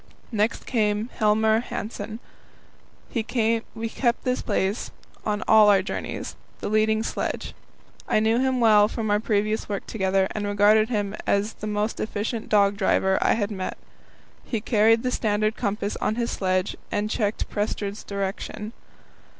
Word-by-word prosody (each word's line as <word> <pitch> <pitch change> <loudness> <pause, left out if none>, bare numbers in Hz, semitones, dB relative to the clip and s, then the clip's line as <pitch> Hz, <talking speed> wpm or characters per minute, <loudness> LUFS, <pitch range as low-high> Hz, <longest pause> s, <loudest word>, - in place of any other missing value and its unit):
Next 215 0 0
came 215 -1 0
Helmer 220 0 +3
Hanssen. 215 -2 -5 0.9
He 230 - 0
kept 230 +1 -1
this 255 0 0
place 195 +3 -1 0.4
on 210 -1 0
all 215 -1 +7
our 195 -2 +5
journeys - - -5 0.2
the - - -3
leading 215 +1 +2
sledge. - - -3 0.5
I - - +3
knew 220 +2 +2
him 260 -1 +1
well 210 -3 +6
from 220 -1 -3
our 205 - +3
previous 215 0 0
work 200 -2 -3
together, 190 -2 +1
and 210 -1 -3
regarded 210 +2 +4
him 205 -3 -1
as 200 +2 +1
the 215 - -7
most 210 +1 -1
efficient 220 +1 -3
dog 200 -1 +3
driver 190 -1 +2
I - - +4
had 210 -1 -1
met. 190 -2 -4 0.7
He 230 - -2
carried 225 +1 +3
the 250 - 0
standard 215 -1 0
compass 205 -2 -2
on 215 - -1
his 235 0 -1
sledge 185 0 0 0.2
and 205 +1 0
checked 215 -1 -1
Prestrud's 205 -1 -3
direction. 200 +2 -4
215 Hz, 150 wpm, -25 LUFS, 205-225 Hz, 0.9 s, all